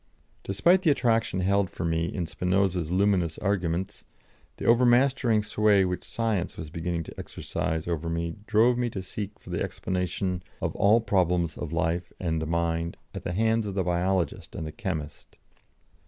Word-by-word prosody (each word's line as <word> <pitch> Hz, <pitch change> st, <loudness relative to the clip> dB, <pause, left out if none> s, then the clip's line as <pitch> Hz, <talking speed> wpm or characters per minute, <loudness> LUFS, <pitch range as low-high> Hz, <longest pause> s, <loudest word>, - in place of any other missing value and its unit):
Despite 170 Hz, -, +3 dB
the 175 Hz, -, +3 dB
attraction 115 Hz, -8 st, +2 dB
held 100 Hz, +1 st, +2 dB
for 85 Hz, -, -5 dB
me 80 Hz, 0 st, +1 dB
in 85 Hz, 0 st, -3 dB
Spinoza's 90 Hz, 0 st, 0 dB
luminous 90 Hz, -4 st, +2 dB
arguments, 95 Hz, -3 st, -1 dB, 0.5 s
the -, -, -5 dB
over 120 Hz, +2 st, +5 dB
mastering 120 Hz, -2 st, +4 dB
sway 105 Hz, -2 st, +3 dB
which 90 Hz, 0 st, -2 dB
Science 110 Hz, -6 st, -2 dB
was 80 Hz, -3 st, -7 dB
beginning 85 Hz, 0 st, -2 dB
to -, -, -10 dB
exercise 80 Hz, +1 st, -3 dB
over 85 Hz, -1 st, -2 dB
me 85 Hz, 0 st, -2 dB
drove 120 Hz, +3 st, +4 dB
me 120 Hz, -1 st, +1 dB
to 95 Hz, -4 st, -5 dB
seek 100 Hz, +2 st, -6 dB
for -, -, -11 dB
the -, -, -2 dB
explanation 90 Hz, 0 st, -2 dB, 0.2 s
of -, -, -2 dB
all 110 Hz, +4 st, +4 dB
problems 90 Hz, -6 st, +1 dB
of 80 Hz, -, -5 dB
life 85 Hz, +1 st, -1 dB
and 80 Hz, -3 st, -1 dB
mind 85 Hz, 0 st, -1 dB, 0.2 s
at -, -, -5 dB
the 85 Hz, -, -3 dB
hands 110 Hz, +2 st, +2 dB
of 100 Hz, -, -4 dB
the 95 Hz, -, +1 dB
biologist 90 Hz, -1 st, -1 dB
and -, -, -4 dB
the 80 Hz, -, -5 dB
chemist. 80 Hz, -10 st, -5 dB
90 Hz, 170 wpm, -27 LUFS, 85-105 Hz, 0.5 s, over